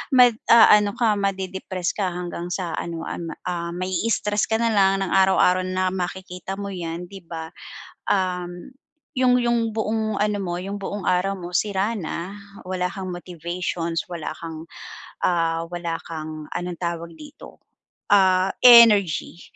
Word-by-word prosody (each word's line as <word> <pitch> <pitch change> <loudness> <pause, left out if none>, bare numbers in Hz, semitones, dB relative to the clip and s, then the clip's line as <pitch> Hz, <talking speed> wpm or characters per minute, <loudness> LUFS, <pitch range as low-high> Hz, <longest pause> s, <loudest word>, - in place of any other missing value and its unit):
mag-aano 230 -4 +6
ka, 225 -3 +2
made-depress 190 -2 -2
ka 200 -3 0
hanggang 175 0 -5
sa 180 -2 -3
ano 165 -1 -5
an 170 -1 -5
ah, 170 -1 -3
mai-stress 200 +3 0
ka 220 - +1
nalang 200 -4 +3
ng 190 - -4
araw-araw 190 -1 +4
na 185 0 0
makikita 185 0 -5
mo 200 0 -4
yan, 170 -2 -5
di 195 +1 -10
ba? 160 -1 -7 0.6
Um, 180 +4 -2 0.4
yung 255 -1 +4
yung 235 -2 +1
buong 220 -1 -1
ano 210 -1 0
mo, 175 -2 -3
yung 195 +3 -5
buong 205 0 -5
araw 190 +2 +1
mo 175 0 -8
sira 200 +3 0
na, 185 -1 -5 0.3
wala 180 -1 -2
kang 185 -2 -6
motivations, 175 -1 -4
wala 170 -3 -5
kang, 160 0 -8 0.6
ah, 165 -2 +1
wala 175 -1 -3
kang 155 -1 -7
anong 175 0 -4
tawag 170 -1 -4
dito, 295 - -13 0.5
ah, 190 -1 +4
energy 210 -9 +6
185 Hz, 140 wpm, -23 LUFS, 175-205 Hz, 0.6 s, mag-aano